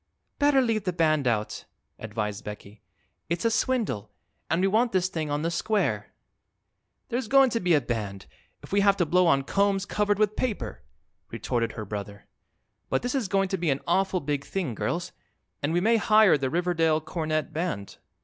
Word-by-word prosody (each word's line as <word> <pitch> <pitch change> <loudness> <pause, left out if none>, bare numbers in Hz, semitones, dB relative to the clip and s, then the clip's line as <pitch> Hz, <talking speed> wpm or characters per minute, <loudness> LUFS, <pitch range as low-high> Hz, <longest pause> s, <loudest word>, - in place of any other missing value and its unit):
"Better 285 -2 +4
leave 220 -5 0
the 180 - 0
band 155 -5 +2
out," 110 -3 -1 0.3
advised 105 -2 -4
Becky. 105 0 -9 0.5
"It's 170 +5 -2
a 230 - +3
swindle, 220 - 0 0.4
and 165 - +1
we 190 - +3
want 225 +4 +2
this 185 -1 +2
thing 155 -4 -3
on 145 +1 -1
the 165 - 0
square." 210 +5 -1 1.0
"There's 245 -1 -2
going 270 0 +5
to 230 - 0
be 180 -4 +3
a 145 - +3
band 105 -5 -4 0.4
if - - -12
we 200 - +3
have 200 0 +4
to 175 - +2
blow 180 +3 +3
on 135 -4 +3
combs 200 +4 +1
covered 205 -1 0
with 215 0 +1
paper," 200 - -3 0.5
retorted 115 -2 -2
her 110 - -6
brother. 100 0 -7 0.6
"But - - 0
this 245 - -1
is 260 -7 0
going 195 0 +1
to 190 - -1
be 170 -2 0
an 135 0 0
awful 190 +1 +1
big 145 -1 -2
thing, 165 -4 -3
girls, 175 - -3 0.5
and 145 - 0
we 175 - +2
may 225 +5 +3
hire 215 -3 +5
the 135 -2 -1
Riverdale 165 -1 +1
Cornet 155 -1 -3
Band." 155 - -4
175 Hz, 185 wpm, -26 LUFS, 135-205 Hz, 1.0 s, going